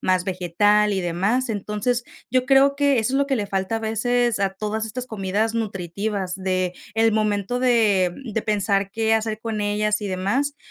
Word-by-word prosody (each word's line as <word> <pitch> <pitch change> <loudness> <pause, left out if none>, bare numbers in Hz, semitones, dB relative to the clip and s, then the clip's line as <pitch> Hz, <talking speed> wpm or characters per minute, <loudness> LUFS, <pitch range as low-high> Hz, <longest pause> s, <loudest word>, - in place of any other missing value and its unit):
más 185 -1 +1
vegetal 205 +3 +2
y 190 - 0
demás, 195 +9 0
entonces, 210 +3 -1 0.3
yo 255 +1 +1
creo 275 +1 +5
que 280 -2 +2
eso 220 +3 0
es 270 - +2
lo 280 0 +1
que 270 - +1
le 210 -3 -2
falta 195 +2 -1
a - - -1
veces 230 +1 0
a 195 -1 +2
todas 215 +2 -3
estas 250 +3 -6
comidas 215 +1 -1
nutritivas, 200 -2 -3
de 185 -1 -1 0.2
el 225 0 +3
momento 215 +2 0
de 215 -8 +3
de 225 -2 -3
pensar 200 -2 0
qué 225 +1 +1
hacer 220 -1 -1
con 225 -2 -3
ellas 210 +1 0
y 205 - -4
demás, 225 +11 -1
215 Hz, 185 wpm, -23 LUFS, 195-230 Hz, 0.3 s, creo